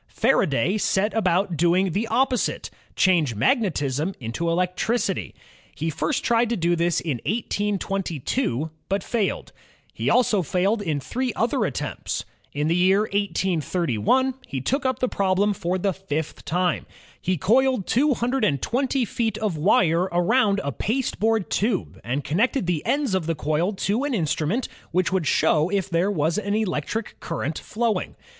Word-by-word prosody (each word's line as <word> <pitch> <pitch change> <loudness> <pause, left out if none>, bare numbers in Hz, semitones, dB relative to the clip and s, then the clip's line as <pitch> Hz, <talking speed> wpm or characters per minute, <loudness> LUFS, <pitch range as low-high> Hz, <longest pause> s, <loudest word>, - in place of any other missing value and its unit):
Faraday 195 - +1
set 205 +2 +1
about 185 -3 +1
doing 175 +3 +2
the 210 +7 -1
opposite, 255 0 0 0.2
change 165 - +3
magnetism 155 - 0
into 125 +8 -3
electricity. 180 +7 -1 0.4
He 160 +1 -2
first 275 - -1
tried 235 0 +2
to 235 - 0
do 175 0 +2
this 170 0 +1
in 140 -9 -3
1822, 195 - -1 0.2
but 195 0 0
failed. 220 -5 -2 0.4
He - - -1
also 220 -5 +3
failed 185 +7 0
in 155 -7 -1
three 250 - -2
other 230 +1 +1
attempts. - - -3 0.3
In 150 +1 -1
the 165 - +2
year 190 +3 +4
1831 190 - 0
he 135 - -3
took 265 - 0
up 260 - 0
the 255 - 0
problem 200 0 +1
for 180 -1 -2
the 195 +1 0
fifth 160 -5 -4
time. 180 +1 0 0.3
He 185 0 0
coiled 250 - +2
220 250 - +1
feet 220 -1 -2
of 210 -6 -1
wire 175 +1 +3
aroimd 200 +4 +3
a 140 - -2
pasteboard 225 - -1
tube 210 -2 -1
and 130 +5 -2
connected 230 - +1
the 170 -4 -1
ends 280 -7 +1
of 185 -4 0
the 165 - 0
coil 155 +6 0
to 205 +6 -1
an 285 -4 -1
instrument 170 - 0 0.2
which 185 +2 +1
would 180 -6 0
show 155 +2 +3
if 195 -1 -1
there 175 +4 +2
was 165 0 0
an 205 -1 -1
electric 215 +1 -2
current 160 -2 -3
flowing. 230 0 -2
190 Hz, 150 wpm, -24 LUFS, 165-225 Hz, 0.4 s, year